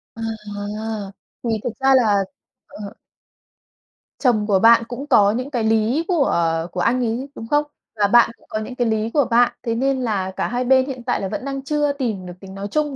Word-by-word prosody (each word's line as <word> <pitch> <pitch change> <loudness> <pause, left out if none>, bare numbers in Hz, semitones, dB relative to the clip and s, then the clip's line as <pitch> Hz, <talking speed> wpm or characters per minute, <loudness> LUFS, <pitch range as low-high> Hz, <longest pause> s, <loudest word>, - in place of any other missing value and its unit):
À! 210 -1 -5 0.3
Thì 235 - -2
thực - - -1
ra 270 0 +4
là, 210 -6 +3 0.4
ờ 205 -1 -9 1.3
Chồng 225 -6 +2
của 200 -3 +3
bạn 230 +2 +6
cũng 250 +4 -6
có 205 -7 +5
những 250 +5 -3
cái 245 -5 -2
lý 225 +8 +1
của 335 -7 +2 0.4
của 180 - -5
anh 240 +7 +2
ấy, 240 +5 -3
đúng 225 - -8
không? 295 +4 +2 0.3
Và 205 -2 +2
bạn 240 +3 +5
cũng - - -26
có 215 - -2
những 220 +4 -6
cái 245 -1 0
lý 220 0 0
của 290 -3 +3
bạn, 240 +1 +3
thế 230 -2 -1
nên 265 +2 0
là 200 -6 -1
cả - - -2
hai 245 +1 -1
bên 260 +1 +4
hiện 260 -3 -6
tại 245 - -1
là 195 - -2
vẫn 210 +6 -5
đang 275 -1 -4
chưa 295 0 0
tìm 230 -9 -3
được 180 - -8
tiếng 190 0 -11
nói 200 +1 -5
chung, 300 -2 0
230 Hz, 215 wpm, -21 LUFS, 210-260 Hz, 1.3 s, bạn